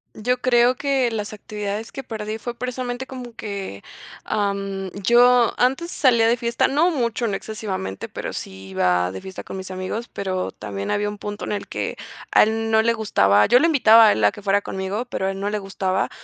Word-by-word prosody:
Yo 250 +3 -1
creo 245 0 +4
que 265 -3 +1
las 210 -1 -4
actividades 210 +1 -5
que 270 - -7
perdí 215 -2 -5
fue 240 0 -5
precisamente 250 0 -4
como 250 -3 -9
que, 200 - -6 0.4
am, 195 -2 -2
yo 245 +1 +5
antes 270 +8 +1
salía 235 -5 +4
de 235 - +4
fiesta, 235 0 0
no 305 +6 +3
mucho, 235 -6 -1
no 205 - -1
excesivamente, 195 - -5
pero - - -5
sí 95 0 -8
iba 90 -1 +1
de 95 - -7
fiesta 190 - -8
con - - -7
mis 185 0 -7
amigos, 185 +5 -4
pero 185 -2 -2
también 100 -1 -6
había 205 0 0
un 205 0 -8
punto 205 0 -5
en - - -4
el 205 -1 -3
que - - -3 0.4
a - - +6
él 225 +1 +1
no 220 0 +5
le 230 +1 +2
gustaba, 105 - +3
yo 245 - +5
lo 330 - +4
invitaba 230 -8 +7
a - - +6
él 110 - -2
a 105 - +5
que - - -11
fuera 200 0 +1
conmigo, 190 +5 -3
pero 190 -5 -3
a - - 0
él 195 - -6
no 200 +1 -2
le 210 - -1
gustaba. 195 -1 -1
215 Hz, 210 wpm, -22 LUFS, 195-240 Hz, 0.4 s, invitaba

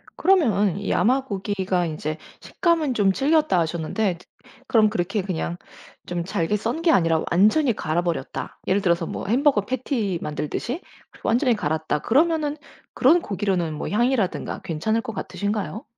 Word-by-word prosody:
그러면 210 - +3
이 200 - -4
야마 255 +8 +2
고기가 190 -4 -1
인제 155 -1 -4 0.2
"식감은 330 -6 0
좀 205 -4 +3
질겼다." 300 - +2
하셨는데 170 +4 -1
트 180 - -19 0.4
그럼 220 -3 +4
그렇게 195 +1 -1
그냥 175 -2 -3 0.5
좀 175 -1 -2
잘게 190 0 0
썬 230 +10 -3
게 335 -1 +4
아니라 165 - +3
완전히 215 - +4
갈아버렸다. 165 -4 -3
예를 195 +2 +2
들어서 170 -2 +1
뭐 - - -5
햄버거 260 +1 +3
패티 230 - -2
만들듯이 155 - -3 0.4
완전히 245 +1 +2
갈았다 155 -4 -1
그러면은 300 - +2 0.4
그런 320 +7 +4
고기로는 190 - -1
뭐 150 - -4
향이라든가 235 -2 0
괜찮을 220 +8 -1
것 225 -2 -6
같으신가요? 210 +2 -3
205 Hz, 345 characters per minute, -23 LUFS, 175-255 Hz, 0.5 s, 그럼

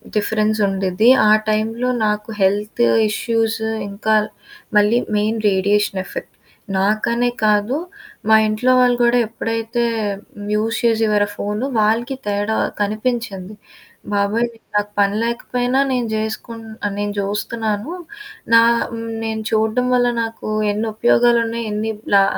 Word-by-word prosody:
Difference 215 +1 +1
ఉండిద్ది. 195 +3 +2 0.2
ఆ - - +6 0.2
టైంలో 225 +3 0 0.2
నాకు 210 +1 -1
హెల్తు 210 +4 +1 0.2
ఇష్యూసు 225 0 -1 0.2
ఇంకా 215 +2 0 0.6
మళ్ళీ 210 +3 +4 0.2
మెయిన్ 215 +2 0
రేడియేషన్ 195 0 +1
ఎఫెక్ట్ - - -8 0.4
నాకనే 215 +5 +1 0.2
కాదు 210 +4 +2 0.5
మా 220 - +7
ఇంట్లో 215 +4 +1
వాళ్ళు 250 -1 +4
కూడా 240 +1 +4
ఎప్పుడైతే 225 +1 -2 0.7
యూజ్ 220 +2 0
చేసేవారో 220 -3 +2
ఫోను 210 +4 -3
వాళ్ళకి 230 +5 +1
తేడా 205 +1 -1 0.3
కనిపించింది. 215 -2 -2 0.6
బాబోయ్! 205 +4 +1 0.3
నాకు 205 0 0
పని 200 0 +3
లేకపోయినా 245 +2 -1
నేను 250 -2 0
చేసుకున్న 220 0 -5
నేను 205 0 -2
చూస్తున్నాను. 210 - -2 0.6
నా 230 - +8 0.6
నేను 220 -1 -3
చూడడం 220 +3 +1
వల్ల 245 0 +3 0.2
నాకు 225 -1 -6 0.2
ఎన్ని 215 +2 -2
ఉపయోగాలున్నయి 235 0 +2
ఎన్ని 215 +1 -2 0.2
లా 195 - +7
220 Hz, 115 wpm, -19 LUFS, 210-230 Hz, 0.7 s, నా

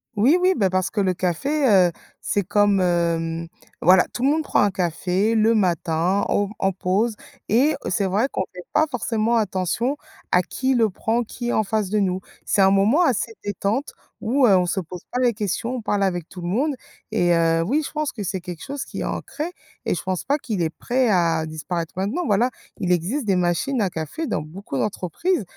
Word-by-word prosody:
Oui, 250 - +4
oui 370 +1 +4
ben 195 -4 +2
parce 185 0 0
que 210 - 0
le 185 -2 +1
café, 265 - 0 0.2
heu, - - -3 0.3
c'est 205 - 0
comme, 205 +1 +3
hem, 170 -2 0 0.3
voilà, 180 +2 +6
tout - - -4
le 270 - +4
monde 315 +2 +1
prend - - +2
un 205 - +4
café 185 +3 0
le 225 +1 +3
matin 175 -1 +1
au 205 -1 +1
en 195 - +2
pause 195 +5 0 0.3
et 265 +8 +3
c'est 205 -4 +1
vrai 200 +7 +1
qu'on - - -1
fait 180 - -8
pas 305 +1 +4
forcément 230 -1 0
attention 215 - 0 0.3
à 180 - +4
qui 260 +8 -1
le 225 -4 +3
prend, 225 +5 0
qui 240 +1 -5
est - - 0
en 220 - +2
face 210 -1 -1
de 215 - 0
nous. 185 -2 0 0.3
C'est 200 - +2
un 190 - +6
moment 200 - +4
assez 235 -6 0
détente 205 +7 -2 0.3
où, 255 +4 +3
heu, 200 -5 +6
on 180 -1 +2
se 185 - 0
pose 180 +1 -9
pas 250 - -1
les 245 -2 +3
questions, 210 +3 -2
on - - -5
parle 205 -2 0
avec 175 -4 -1
tout 180 - -9
le 175 - -4
monde 270 - 0 0.4
et 175 -5 +2
heu, 165 0 +3
oui, 280 - +1
je - - -6
pense 305 -2 -2
que 215 - -8
c'est 190 0 -2
quelque 175 -2 -8
chose 280 0 -5
qui - - -7
est - - -2
ancré 305 - -4 0.4
et - - +1
je 165 - -5
pense 185 -1 -2
pas 285 +2 +2
qu'il 220 -10 -3
est 165 - +1
prêt 245 +9 0
à 165 -4 +2
disparaître 160 +2 -4
maintenant. 215 - -1
Voilà, 230 +4 +2 0.3
il 180 - 0
existe 190 - 0
des 195 -3 +2
machines 180 +9 0
à 195 - +1
café 170 - -4
dans 150 - -1
beaucoup 155 -1 -7
d'entreprises, 210 - -1
200 Hz, 215 wpm, -23 LUFS, 180-240 Hz, 0.4 s, voilà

